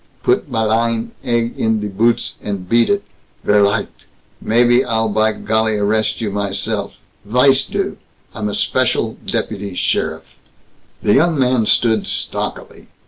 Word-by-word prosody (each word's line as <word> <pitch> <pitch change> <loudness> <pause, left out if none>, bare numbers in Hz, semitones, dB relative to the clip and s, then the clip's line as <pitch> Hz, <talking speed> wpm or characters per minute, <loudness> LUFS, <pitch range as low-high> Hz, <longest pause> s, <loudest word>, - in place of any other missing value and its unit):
put 375 - +1
mal 110 -3 0
ein 115 0 0
egg 120 -1 0
in 110 -1 +1
die 105 - -3
boots 115 +4 0
and 100 -3 -5
beat 115 +3 +3
it, 200 0 +1 0.4
verleicht 100 0 +1 0.3
maybe 120 +2 +4
I'll 110 -1 0
by 110 +1 +2
golly 110 0 0
arrest 110 +3 0
you 105 -3 -2
myself, 100 0 -2 0.3
weiss 125 +5 +3
du! - - -3 0.3
I'm 105 -1 -3
a 100 - -3
special - - 0
deputy 100 -3 -3
sheriff." - - -2 0.7
The 105 - +3
young 160 +2 +3
man 125 -4 +2
stood 110 -3 +2
stockily. - - -4
110 Hz, 140 wpm, -18 LUFS, 105-120 Hz, 0.7 s, maybe